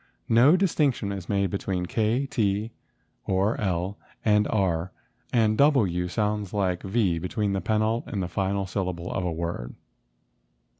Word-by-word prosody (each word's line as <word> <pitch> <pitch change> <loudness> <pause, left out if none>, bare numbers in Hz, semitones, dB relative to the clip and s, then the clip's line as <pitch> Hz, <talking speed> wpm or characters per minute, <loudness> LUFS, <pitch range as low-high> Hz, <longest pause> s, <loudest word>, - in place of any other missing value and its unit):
No 125 +10 +6
distinction 145 - +1
is 95 -3 -6
made 100 -2 +1
between 95 -2 -2
k 110 +5 +1
and 140 - -5
t 105 0 0 0.6
or 95 +3 +2
l 95 0 -1 0.3
and 105 -1 +4
r, 95 -4 0 0.4
and 110 -2 +3
w 105 - +3
sounds 105 0 -2
like 95 -3 0
v 95 -4 +1
between 100 +3 -1
the 95 - -1
penult 110 +1 0
and 95 -4 -2
final 95 +1 -1
syllable 90 -2 -3
of 90 - -1
a 90 - -1
word. 80 -7 -4
100 Hz, 145 wpm, -26 LUFS, 90-110 Hz, 0.6 s, No